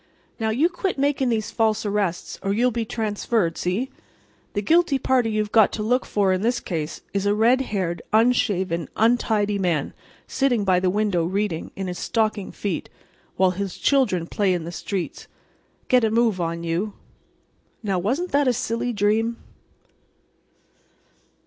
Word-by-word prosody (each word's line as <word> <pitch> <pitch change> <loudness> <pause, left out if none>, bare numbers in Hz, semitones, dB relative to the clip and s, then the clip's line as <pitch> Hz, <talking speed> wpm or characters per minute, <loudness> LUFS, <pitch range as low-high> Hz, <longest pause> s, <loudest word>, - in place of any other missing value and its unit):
Now, 220 -1 0
you 260 +10 +3
quit 360 0 -3
making 275 -2 +1
these 220 -3 -1
false 220 -1 +1
arrests, 200 -4 -2
or 195 0 0
you'll 245 +4 +2
be 230 -1 -2
transferred—see? 215 - -1 0.6
The 205 - -1
guilty 330 +2 +3
party 255 -3 +1
you've 215 -1 -1
got 220 -3 +5
to 215 - -3
look 250 +4 +1
for 195 -2 +2
in 185 - -1
this 240 +3 +1
case 160 -3 -4
is 200 0 0
a 205 - +3
red 235 +5 +4
haired, 185 -9 -2
unshaven, 190 - +2
untidy 215 -3 +2
man, 170 -6 0 0.3
sitting 250 -6 +1
by 185 -2 +4
the 185 0 +1
window 200 -3 +1
reading, 190 -1 -2
in 195 - -4
his 180 -1 -5
stocking 215 -3 -1
feet, 195 -5 -4 0.5
while 185 0 +3
his 195 0 -4
children 255 -12 +2
play 190 +1 +1
in 170 - -3
the 170 - -6
streets. 185 +2 -4 0.6
Get 250 -2 +4
a 220 - +3
move 225 -4 +2
on 170 0 -2
you." 175 +5 -2 0.9
Now, 195 -3 0
wasn't 265 - -1
that 285 -1 +3
a 250 - +4
silly 230 +1 -2
dream? 220 +3 +1
210 Hz, 155 wpm, -23 LUFS, 185-235 Hz, 0.9 s, got